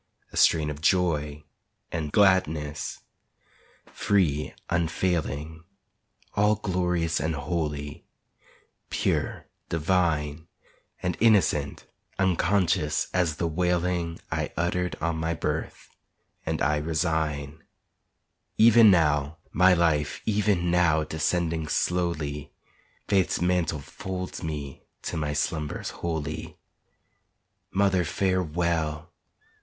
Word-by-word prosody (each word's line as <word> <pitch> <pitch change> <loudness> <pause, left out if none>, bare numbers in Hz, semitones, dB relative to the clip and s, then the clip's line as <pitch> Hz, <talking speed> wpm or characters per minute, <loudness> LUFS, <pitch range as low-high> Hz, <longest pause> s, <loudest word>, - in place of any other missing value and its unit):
A - - -11
strain 75 -2 +4
of 75 0 -8
joy 75 -4 +1 0.5
and 80 -3 -3
gladness, 80 -7 +1 0.8
free, 80 -8 0 0.2
unfailing 80 -2 -1 0.7
All 105 +1 +3
glorious 90 -4 0
and 80 0 -1
holy, 75 -1 -3 0.9
pure, - - -1 0.2
divine, 80 -2 0 0.6
And 90 -1 -1
innocent, 95 -10 +2 0.3
unconscious 90 -4 +1
as 85 -4 +1
the 85 - -2
wailing 90 0 0
I - - -2
uttered 90 +2 0
on 85 0 -1
my 80 +1 -1
birth; - - -4 0.6
and - - -1
I 75 +1 +2
resign 80 -1 -1 0.9
Even 115 0 +8
now, 75 -4 +2
my 90 +1 +5
life, 80 -4 +1
even 100 -5 +1
now 85 -3 +3
descending 80 +1 -1
slowly, 75 -4 -1 0.6
Faith's 95 -3 +2
mantle 85 -4 0
folds 95 +4 -6
me 75 -5 -5 0.2
to - - -4
my 75 -2 -1
slumbers 75 +1 -2
holy. 80 +1 -4 1.1
Mother, 95 -2 +2
farewell! 85 -3 -1
80 Hz, 95 wpm, -26 LUFS, 75-90 Hz, 1.1 s, Even